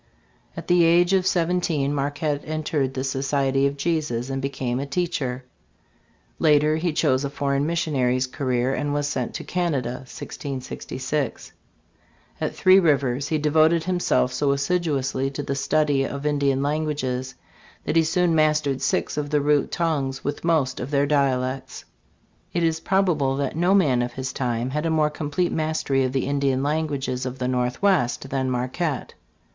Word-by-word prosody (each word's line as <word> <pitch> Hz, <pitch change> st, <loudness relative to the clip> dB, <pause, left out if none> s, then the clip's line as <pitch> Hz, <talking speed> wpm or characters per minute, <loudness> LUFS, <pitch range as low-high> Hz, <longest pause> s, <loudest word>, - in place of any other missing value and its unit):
At -, -, -7 dB
the 175 Hz, -1 st, +5 dB
age 175 Hz, +2 st, +4 dB
of 190 Hz, -1 st, +2 dB
seventeen, 170 Hz, -5 st, +1 dB
Marquette 145 Hz, +1 st, -1 dB
entered 155 Hz, -3 st, -2 dB
the 130 Hz, -, -2 dB
Society 135 Hz, 0 st, +1 dB
of 140 Hz, +1 st, -4 dB
Jesus 140 Hz, -6 st, -1 dB
and 135 Hz, 0 st, -2 dB
became 130 Hz, -2 st, -2 dB
a 140 Hz, -, -4 dB
teacher. 140 Hz, -5 st, -2 dB, 0.9 s
Later 150 Hz, 0 st, +4 dB
he 170 Hz, +1 st, 0 dB
chose 130 Hz, -3 st, +1 dB
a 140 Hz, -, -2 dB
foreign 140 Hz, 0 st, -1 dB
missionary's 135 Hz, -7 st, +1 dB
career, 130 Hz, -1 st, -1 dB
and 145 Hz, +1 st, -1 dB
was 145 Hz, 0 st, 0 dB
sent 130 Hz, -4 st, -3 dB
to -, -, -4 dB
Canada 145 Hz, -9 st, -1 dB
(1666). 135 Hz, 0 st, -5 dB, 0.9 s
At -, -, -2 dB
Three 185 Hz, +1 st, +6 dB
Rivers 140 Hz, -5 st, +1 dB
he 155 Hz, -, 0 dB
devoted 155 Hz, +2 st, +3 dB
himself 175 Hz, -7 st, +1 dB
so 140 Hz, +2 st, +1 dB
assiduously 140 Hz, -3 st, 0 dB
to 140 Hz, +1 st, -5 dB
the 140 Hz, -, -2 dB
study 145 Hz, 0 st, +1 dB
of 140 Hz, +1 st, -5 dB
Indian 140 Hz, -2 st, +1 dB
languages 140 Hz, -4 st, -2 dB, 0.5 s
that -, -, -1 dB
he 165 Hz, -, +6 dB
soon 170 Hz, +1 st, +1 dB
mastered 155 Hz, -3 st, +2 dB
six -, -, 0 dB
of 145 Hz, -1 st, -2 dB
the 150 Hz, 0 st, +2 dB
root 145 Hz, 0 st, +2 dB
tongues, 140 Hz, -6 st, -1 dB
with 145 Hz, 0 st, -3 dB
most 155 Hz, -6 st, +1 dB
of 125 Hz, -, -4 dB
their 140 Hz, -1 st, +2 dB
dialects. 130 Hz, -2 st, -1 dB, 0.7 s
It 170 Hz, -, 0 dB
is 160 Hz, -1 st, +1 dB
probable 165 Hz, -8 st, +1 dB
that 140 Hz, 0 st, -2 dB
no 175 Hz, +4 st, +3 dB
man 135 Hz, -11 st, +3 dB
of 120 Hz, 0 st, -3 dB
his 130 Hz, 0 st, -4 dB
time 120 Hz, -1 st, -2 dB
had 150 Hz, +3 st, -1 dB
a -, -, 0 dB
more 155 Hz, -1 st, +2 dB
complete 150 Hz, +4 st, -1 dB
mastery 155 Hz, -4 st, 0 dB
of 130 Hz, -, 0 dB
the 135 Hz, -1 st, -1 dB
Indian 140 Hz, -1 st, 0 dB
languages 145 Hz, -4 st, -1 dB
of 130 Hz, 0 st, -4 dB
the 125 Hz, -, -2 dB
Northwest 125 Hz, +2 st, 0 dB
than 130 Hz, -1 st, 0 dB
Marquette. 130 Hz, +4 st, -2 dB
140 Hz, 160 wpm, -24 LUFS, 130-155 Hz, 0.9 s, Three